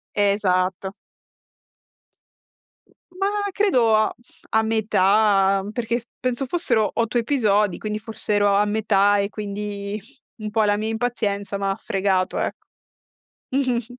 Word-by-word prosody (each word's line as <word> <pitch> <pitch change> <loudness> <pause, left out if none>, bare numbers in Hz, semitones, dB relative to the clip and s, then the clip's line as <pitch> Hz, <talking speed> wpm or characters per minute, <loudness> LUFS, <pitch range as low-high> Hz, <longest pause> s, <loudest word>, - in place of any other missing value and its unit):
Esatto. 190 -2 +1 2.2
Ma 380 +2 -2 0.3
credo 255 - +3
a 215 - +1 0.4
a 220 0 +3
metà, 200 -2 +3
perché 235 0 -2 0.2
penso 255 +1 -1
fossero 245 -9 +1
8 230 0 -1
episodi, 210 -6 +1
quindi 215 0 -3
forse 215 -1 -4
ero 205 -1 +3
a 205 - +4
metà 205 -1 +2
e 200 0 0
quindi 205 0 -5 0.4
un 215 -2 -6
po' 220 +1 +1
la 205 0 +2
mia 215 +1 -2
impazienza 210 -4 -2
m'ha 195 0 0
fregato, 190 -1 -1
ecco. - - -4 0.8
Mh-mh-mh. 255 -4 0
210 Hz, 115 wpm, -22 LUFS, 200-225 Hz, 2.2 s, a